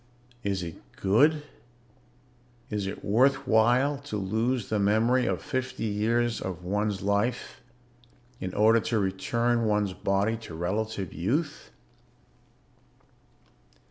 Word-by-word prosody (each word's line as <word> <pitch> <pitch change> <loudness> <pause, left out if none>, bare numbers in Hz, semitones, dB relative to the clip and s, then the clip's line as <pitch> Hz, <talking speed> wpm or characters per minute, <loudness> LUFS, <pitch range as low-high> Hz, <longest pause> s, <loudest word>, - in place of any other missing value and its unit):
"Is 100 -2 -1
it 85 -1 -8
good? 145 +10 +3 1.3
Is 105 -2 -2
it 95 - -6
worth 130 +6 +3
while 125 +6 +3
to 140 -7 -5
lose 110 +4 -1
the 110 - 0
memory 115 +5 +2
of - - -2
fifty 130 -3 -3
years 115 +2 0
of 90 -2 -5
one's 100 +1 -1
life 105 +7 -1 0.8
in 95 - -4
order 110 +2 +5
to 115 0 -1
return 115 +5 0
one's 105 -3 +1
body 100 +4 0
to 110 -8 -10
relative 95 +2 -3
youth? 145 - -2
110 Hz, 110 wpm, -27 LUFS, 100-120 Hz, 1.3 s, order